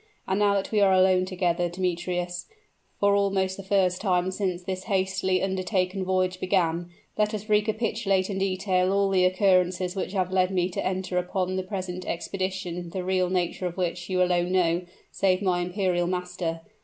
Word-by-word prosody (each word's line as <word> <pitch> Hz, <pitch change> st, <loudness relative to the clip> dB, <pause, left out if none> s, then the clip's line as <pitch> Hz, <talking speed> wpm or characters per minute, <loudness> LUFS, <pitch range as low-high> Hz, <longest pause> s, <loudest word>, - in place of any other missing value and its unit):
And 190 Hz, +1 st, 0 dB
now 205 Hz, -1 st, +3 dB
that 195 Hz, -, -2 dB
we 215 Hz, -2 st, +2 dB
are 195 Hz, -1 st, +5 dB
alone 185 Hz, 0 st, +4 dB
together, 175 Hz, -2 st, 0 dB
Demetrius, 175 Hz, 0 st, -2 dB, 0.5 s
for 200 Hz, 0 st, +4 dB
almost 195 Hz, -2 st, +1 dB
the 195 Hz, -, -8 dB
first 190 Hz, -2 st, +1 dB
time 185 Hz, -2 st, +1 dB
since 185 Hz, -2 st, -2 dB
this 185 Hz, 0 st, -4 dB
hastily 190 Hz, -1 st, 0 dB
undertaken 190 Hz, 0 st, -1 dB
voyage 185 Hz, 0 st, 0 dB
began, 175 Hz, -2 st, 0 dB, 0.3 s
let 210 Hz, +1 st, +2 dB
us 215 Hz, 0 st, -6 dB
recapitulate 210 Hz, -2 st, +1 dB
in 195 Hz, -2 st, -3 dB
detail 185 Hz, -1 st, +1 dB
all 200 Hz, 0 st, +2 dB
the 185 Hz, -1 st, +4 dB
occurrences 185 Hz, -1 st, +2 dB
which 195 Hz, -, -3 dB
have 185 Hz, -2 st, 0 dB
led 185 Hz, -1 st, +3 dB
me 185 Hz, -1 st, 0 dB
to 180 Hz, -, -3 dB
enter 185 Hz, -1 st, -1 dB
upon 185 Hz, +1 st, -2 dB
the 185 Hz, -, 0 dB
present 185 Hz, -2 st, -5 dB
expedition 180 Hz, -1 st, -3 dB
the 185 Hz, +1 st, -4 dB
real 185 Hz, -1 st, +1 dB
nature 180 Hz, 0 st, -1 dB
of 175 Hz, -, -7 dB
which 175 Hz, 0 st, -2 dB
you 185 Hz, -1 st, +2 dB
alone 180 Hz, 0 st, +1 dB
know, 175 Hz, -2 st, +2 dB, 0.3 s
save 185 Hz, -2 st, +2 dB
my 185 Hz, -3 st, +1 dB
imperial 180 Hz, -1 st, 0 dB
master. 180 Hz, -2 st, -3 dB
185 Hz, 175 wpm, -26 LUFS, 180-190 Hz, 0.5 s, are